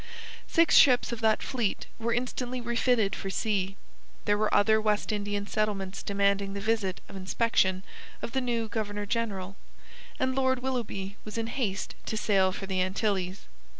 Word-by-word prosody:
Six 330 -1 +4
ships 250 -3 +6
of 235 -1 -4
that 220 -1 +3
fleet 235 -6 -1
were 230 +1 -1
instantly 250 +1 -2
refitted 240 -3 +1
for 195 - -5
sea. 195 -2 -1 0.5
There 205 - +3
were 215 +1 +1
other 220 +1 +4
West 210 0 +1
Indian 205 -1 -2
settlements 200 -3 -2
demanding 200 0 +1
the - - -2
visit 205 -3 0
of - - -11
inspection 190 -1 +1 0.4
of - - -5
the 265 - 0
new 235 -2 -1
Governor 210 -1 -3
General, 200 -4 -2 0.6
and 260 -2 +1
Lord 260 -1 +1
Willoughby 210 -6 -3
was 215 +1 -7
in 230 - -1
haste 225 -5 -2
to 220 - -2
sail 195 -3 +3
for 195 - -5
the 190 -1 0
Antilles. 190 0 -1
210 Hz, 160 wpm, -29 LUFS, 195-235 Hz, 0.6 s, ships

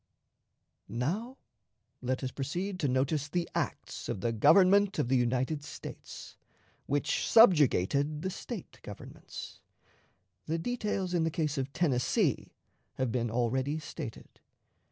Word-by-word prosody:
Now 200 - -2 0.6
let 130 +2 -2
us 130 - -2
proceed 180 +9 -3
to 150 - +1
notice 140 +3 0
the 175 +2 -1
acts - - -3
of 95 - -3
the 115 - +1
Government 185 - +5
of 145 -6 0
the 135 - +3
United 130 +4 +1
States, 150 - -9 0.5
which 145 +2 0
subjugated 150 - +5
the 190 - -1
State 215 0 -7
governments. 105 - -9 0.9
The 160 +2 0
details 200 -2 -2
in 170 -2 +2
the 165 - +1
case 155 -3 -1
of 135 +1 -3
Tennessee 135 -7 +1 0.4
have 130 -3 -1
been 120 -1 0
already 130 +5 0
stated. 155 - -8
150 Hz, 125 wpm, -31 LUFS, 130-175 Hz, 0.9 s, Government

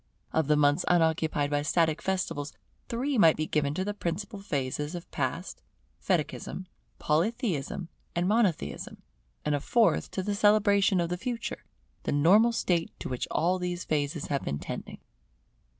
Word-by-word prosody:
Of 160 -3 +2
the 150 - +4
months 145 +3 +3
unoccupied 160 -4 +2
by 145 0 +1
static 160 +1 +1
festivals, 175 -6 -2 0.4
three 255 +2 0
might 165 -5 +6
be 155 - 0
given 150 -2 0
to 185 - -1
the 205 - -2
principal 205 +3 -4
phases 145 -2 -2
of 175 - -5
the - - -37
Past, 155 +6 -3 0.4
Fetichism, 185 - -2 0.3
Polytheism, 175 - -1 0.3
and 175 +1 +1
Monotheism; 210 -5 0 0.4
and 150 - +1
a 145 - +1
fourth 230 - +2
to 190 - -3
the 205 - -1
celebration 200 -2 +4
of 170 -1 0
the 180 - -2
Future, 235 +4 -4 0.4
the - - -2
normal 190 +11 +5
state 175 -7 0
to - - -5
which 125 -1 -3
all 180 +4 +1
these 180 0 -3
phases 150 0 -1
have 140 -1 -1
been 70 - -2
tending. - - -6
170 Hz, 160 wpm, -28 LUFS, 150-200 Hz, 0.4 s, might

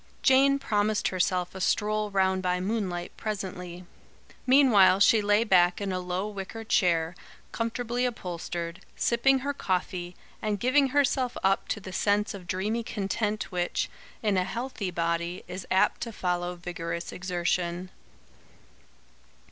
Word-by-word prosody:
Jane 275 +1 +5
promised 215 -5 0
herself 180 -1 0
a 190 - -7
stroll 210 +2 +1
round 190 -1 +1
by 180 -1 0
moonlight 185 -3 -2
presently. 180 -4 -5 0.6
Meanwhile 230 -9 +6
she 220 +1 +6
lay 205 +2 +3
back 180 -5 +4
in 200 -1 -2
a 185 - -1
low 180 +2 -2
wicker 210 +2 -6
chair, 170 -6 +2 0.4
comfortably 240 +2 -1
upholstered, 170 -5 -5
sipping 265 +3 +3
her 285 - 0
coffee, 180 -5 -2 0.3
and 210 -2 -1
giving 270 +5 +3
herself 265 -2 +1
up 195 0 +2
to - - -2
the 190 -2 -9
sense 205 +2 +1
of 185 -3 -9
dreamy 210 +6 -1
content 210 -1 -2
which, 175 -1 -1 0.3
in 205 -3 +2
a 185 - +3
healthy 230 -1 -4
body, 170 +1 -2
is 185 +1 -7
apt 190 - +2
to 235 - -3
follow 180 -3 -2
vigorous 170 -1 -5
exertion. 180 0 -2
195 Hz, 135 wpm, -28 LUFS, 180-220 Hz, 0.6 s, Meanwhile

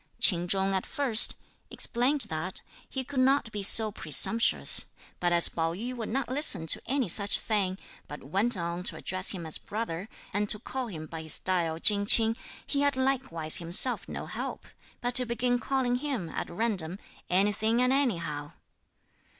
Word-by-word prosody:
Ch'in 175 -3 +6
Chung 195 +1 -1
at 190 - -3
first 270 -7 +3 0.3
(explained 260 +5 -1
that) 160 +1 -5 0.3
he 265 - -5
could 265 +1 -5
not 265 -3 +1
be 210 - -5
so 215 +2 +5
presumptuous; 225 +7 +3 0.3
but 175 0 -1
as 170 -1 +6
Pao 165 0 -3
yü 245 +6 -6
would 230 -3 -6
not 270 +4 -3
listen 255 - +2
to - - 0
any 265 -1 -1
such 200 +3 +4
thing, 195 -4 -2 0.3
but 150 - -10
went 195 - -1
on 170 0 -5
to - - -3
address 185 0 -1
him 175 -4 0
as 160 - -1
brother 205 -2 -6 0.2
and 205 +1 -2
to - - +4
call 255 +3 -6
him 160 -7 -8
by 160 0 -9
his 160 -1 +1
style 170 -4 -2
Ch'ing 205 +1 +5
Ch'ing, 225 +1 +7 0.3
he 280 - -2
had 285 -1 +1
likewise 260 -12 +1
himself 175 +9 -1
no - - -7
help, - - -7 0.4
but 245 0 -2
to 250 - +6
begin 245 +1 -1
calling 250 -2 -1
him, 250 - -5
at - - -6
random, 185 -3 -3 0.3
anything 210 +5 0
and 250 +1 +2
anyhow. 170 - -2
210 Hz, 175 wpm, -27 LUFS, 175-250 Hz, 0.4 s, Ch'ing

